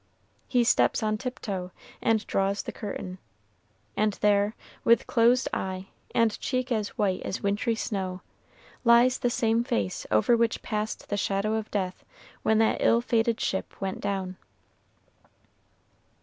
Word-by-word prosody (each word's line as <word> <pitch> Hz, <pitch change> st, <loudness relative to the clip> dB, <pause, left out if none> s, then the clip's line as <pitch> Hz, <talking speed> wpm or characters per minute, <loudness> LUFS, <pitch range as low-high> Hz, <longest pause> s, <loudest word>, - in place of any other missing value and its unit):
He 245 Hz, -2 st, +3 dB
steps 235 Hz, -1 st, +3 dB
on 215 Hz, 0 st, 0 dB
tiptoe, 200 Hz, -8 st, -4 dB, 0.3 s
and 225 Hz, -2 st, +2 dB
draws 195 Hz, +1 st, 0 dB
the -, -, -5 dB
curtain; 190 Hz, -3 st, -6 dB, 0.8 s
and 210 Hz, -1 st, +2 dB
there, 205 Hz, +1 st, +2 dB, 0.3 s
with 235 Hz, 0 st, +4 dB
closed 240 Hz, +2 st, +3 dB
eye, 190 Hz, 0 st, -3 dB, 0.3 s
and 230 Hz, -3 st, +2 dB
cheek 255 Hz, -1 st, -2 dB
as 215 Hz, -3 st, +1 dB
white 195 Hz, -3 st, +1 dB
as -, -, -4 dB
wintry 205 Hz, +3 st, +1 dB
snow, 190 Hz, -4 st, -3 dB, 0.6 s
lies 240 Hz, +1 st, +5 dB
the 245 Hz, -, +1 dB
same 230 Hz, -1 st, +1 dB
face 100 Hz, -, -2 dB
over 110 Hz, -, +4 dB
which 230 Hz, -1 st, 0 dB
passed 215 Hz, -1 st, -3 dB
the 205 Hz, -, -1 dB
shadow 200 Hz, +2 st, 0 dB
of 220 Hz, -1 st, -2 dB
death 185 Hz, -3 st, -3 dB, 0.4 s
when 220 Hz, -, +3 dB
that 220 Hz, 0 st, +3 dB
ill 235 Hz, -, +4 dB
fated 230 Hz, -1 st, +1 dB
ship 190 Hz, -, -3 dB
went 190 Hz, -1 st, -3 dB
down. 190 Hz, -2 st, -3 dB
215 Hz, 140 wpm, -27 LUFS, 195-230 Hz, 0.8 s, lies